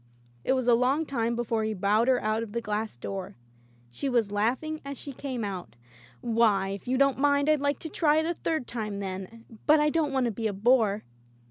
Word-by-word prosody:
It -, -, +2 dB
was 255 Hz, -2 st, -1 dB
a 240 Hz, -, +6 dB
long 260 Hz, +7 st, +2 dB
time 235 Hz, -4 st, -1 dB
before 230 Hz, -2 st, -1 dB
he 215 Hz, 0 st, -1 dB
bowed 210 Hz, +5 st, +2 dB
her 255 Hz, -1 st, +4 dB
out 215 Hz, +1 st, 0 dB
of 220 Hz, -2 st, -6 dB
the 235 Hz, -, 0 dB
glass 215 Hz, -, -3 dB
door. 190 Hz, +8 st, -6 dB, 0.6 s
She 270 Hz, -, -3 dB
was 235 Hz, -5 st, +1 dB
laughing 255 Hz, +10 st, -1 dB
as 280 Hz, -1 st, -6 dB
she 280 Hz, -, -6 dB
came 255 Hz, -3 st, -4 dB
out: 185 Hz, -, -5 dB, 0.5 s
"Why, 220 Hz, -5 st, +2 dB
if 195 Hz, +2 st, -6 dB
you 255 Hz, +1 st, +1 dB
don't 275 Hz, 0 st, +3 dB
mind, 285 Hz, 0 st, +3 dB
I'd 305 Hz, -2 st, +3 dB
like 285 Hz, 0 st, +1 dB
to 320 Hz, -, -5 dB
try 305 Hz, -1 st, +2 dB
it 315 Hz, -, +2 dB
a 340 Hz, -, 0 dB
third 320 Hz, -5 st, -2 dB
time, 215 Hz, -4 st, -4 dB
then; 195 Hz, +4 st, -6 dB, 0.2 s
but 305 Hz, +1 st, +6 dB
I 300 Hz, 0 st, +3 dB
don't 310 Hz, -3 st, +1 dB
want 265 Hz, -2 st, +1 dB
to 235 Hz, -, 0 dB
be 220 Hz, +1 st, -2 dB
a 210 Hz, -, -2 dB
bore." 215 Hz, 0 st, +2 dB
235 Hz, 225 wpm, -28 LUFS, 210-280 Hz, 0.6 s, a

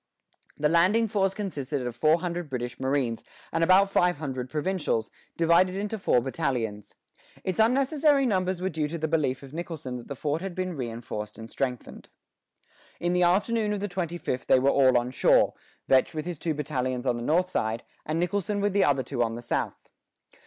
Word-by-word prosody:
The 150 Hz, -, +2 dB
landing 185 Hz, +8 st, +3 dB
force 195 Hz, -2 st, 0 dB
consisted 145 Hz, -9 st, -3 dB
of 120 Hz, -1 st, -4 dB
four 155 Hz, +6 st, +3 dB
hundred 175 Hz, -3 st, -3 dB
British 125 Hz, -2 st, -4 dB
marines, 130 Hz, -3 st, 0 dB, 0.3 s
and 165 Hz, -, +1 dB
about 190 Hz, +3 st, +5 dB
fifteen 180 Hz, -2 st, +3 dB
hundred 130 Hz, -4 st, -5 dB
provincials, 150 Hz, -6 st, -1 dB, 0.3 s
divided 170 Hz, +3 st, +4 dB
into 210 Hz, +2 st, -3 dB
four 125 Hz, -, +3 dB
battalions. 120 Hz, -6 st, -3 dB, 0.5 s
Its 185 Hz, +2 st, -2 dB
unnecessary 275 Hz, +4 st, +3 dB
numbers 185 Hz, -5 st, 0 dB
were 190 Hz, -, +1 dB
due 155 Hz, -3 st, -1 dB
to 165 Hz, +3 st, -4 dB
the 160 Hz, 0 st, -1 dB
belief 150 Hz, -5 st, 0 dB
of 135 Hz, +1 st, -12 dB
Nicholson 160 Hz, -6 st, -5 dB
that 120 Hz, -, -10 dB
the 140 Hz, -, -5 dB
fort 150 Hz, +4 st, -2 dB
had 190 Hz, -2 st, -5 dB
been 185 Hz, -1 st, -3 dB
reinforced 115 Hz, -4 st, -5 dB
and 110 Hz, 0 st, -9 dB
strengthened. 125 Hz, -3 st, -4 dB, 0.9 s
In 175 Hz, +1 st, 0 dB
the 180 Hz, -, +2 dB
afternoon 210 Hz, +4 st, +2 dB
of 205 Hz, -, -2 dB
the 205 Hz, -, -2 dB
twenty 175 Hz, -2 st, -3 dB
fifth 130 Hz, -6 st, -3 dB
they -, -, +6 dB
were 135 Hz, +2 st, +3 dB
all 130 Hz, -2 st, +5 dB
on 120 Hz, +1 st, -1 dB
shore, -, -, +4 dB, 0.3 s
Vetch 130 Hz, +3 st, +3 dB
with 155 Hz, 0 st, -3 dB
his 175 Hz, -4 st, -5 dB
two 160 Hz, -2 st, -1 dB
battalions 130 Hz, -4 st, -2 dB
on 125 Hz, -2 st, +2 dB
the 120 Hz, -, -5 dB
north 175 Hz, +8 st, +1 dB
side, 110 Hz, -4 st, -1 dB, 0.2 s
and 155 Hz, +2 st, -2 dB
Nicholson 200 Hz, +4 st, -1 dB
with 205 Hz, -1 st, +1 dB
the 200 Hz, -, +4 dB
other 135 Hz, -2 st, +2 dB
two 125 Hz, 0 st, -3 dB
on 115 Hz, -1 st, 0 dB
the 120 Hz, -, -6 dB
south. 120 Hz, -, -3 dB
160 Hz, 195 wpm, -27 LUFS, 130-185 Hz, 0.9 s, they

